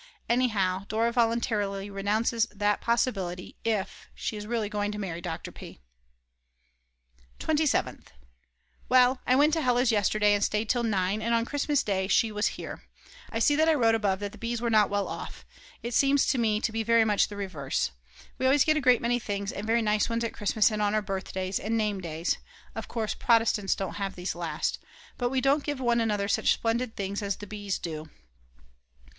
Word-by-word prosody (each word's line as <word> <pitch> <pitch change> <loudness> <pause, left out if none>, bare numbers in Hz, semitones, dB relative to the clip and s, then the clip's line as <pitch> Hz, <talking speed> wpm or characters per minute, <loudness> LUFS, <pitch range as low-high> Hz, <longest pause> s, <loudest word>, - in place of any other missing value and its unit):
Anyhow, 200 -6 +1
Dora 225 +2 +1
voluntarily 220 -4 0
renounces 215 +4 0
that 210 -1 0
possibility, 195 -7 -1
if 215 -4 -2
she - - -4
is 210 0 -6
really 225 -2 -1
going 205 -1 -2
to 210 - -6
marry 175 -5 -4
Dr. 165 -2 -5
P. - - -11 1.6
27th. 310 -2 0 0.8
Well, 255 0 +5
I 255 - +4
went 295 +3 +4
to 325 - +1
Hella's 245 -2 +2
yesterday 210 0 +3
and 205 0 +1
stayed 210 +1 0
till 245 - +2
9, 205 -2 0
and 230 +1 +1
on 230 0 +1
Christmas 290 +2 0
Day 190 -2 -1
she 220 +2 +3
was 210 0 0
here. - - -7 0.5
I - - -3
see 290 +6 +3
that 315 +2 +3
I 320 - +4
wrote 230 -5 +3
above 205 -3 0
that 205 -1 -3
the 215 - -14
Bs. 235 0 -2
were 235 0 -1
not 215 -2 +4
well 205 -1 -1
off; - - -7 0.4
it 235 +1 -4
seems 275 +3 +4
to 260 - +1
me 215 -2 +2
to 230 - 0
be 225 0 -1
very 230 0 +4
much 210 -2 +3
the 205 - -9
reverse. 160 - -2 0.5
We 260 - +2
always 275 +1 +4
get 310 0 +3
a - - 0
great 250 -3 +4
many 245 +1 +1
things 200 -2 -3
and 205 +2 -6
very 230 +1 +2
nice 210 0 +1
ones 230 0 -1
at 230 - -3
Christmas 210 +2 +2
and 210 0 -2
on 205 0 +1
our 215 - +1
birthdays 190 -1 -3
and 225 +3 -1
name 210 -3 -1
days 165 -1 -2 0.3
(of - - -6
course 220 -3 -2
Protestants 225 -4 +2
don't 195 0 -4
have 195 -1 -2
these 180 +1 -3
last), 165 -3 -2 0.4
but 245 -1 +1
we 260 0 0
don't 275 +2 +2
give 290 -3 -3
one 240 -2 +2
another 210 -3 0
such 200 - +3
splendid 230 +1 -1
things 200 +1 -3
as 200 -1 -1
the 205 - -9
Bs. 205 -1 -4
do. 155 -2 -6
215 Hz, 195 wpm, -28 LUFS, 200-235 Hz, 1.6 s, Well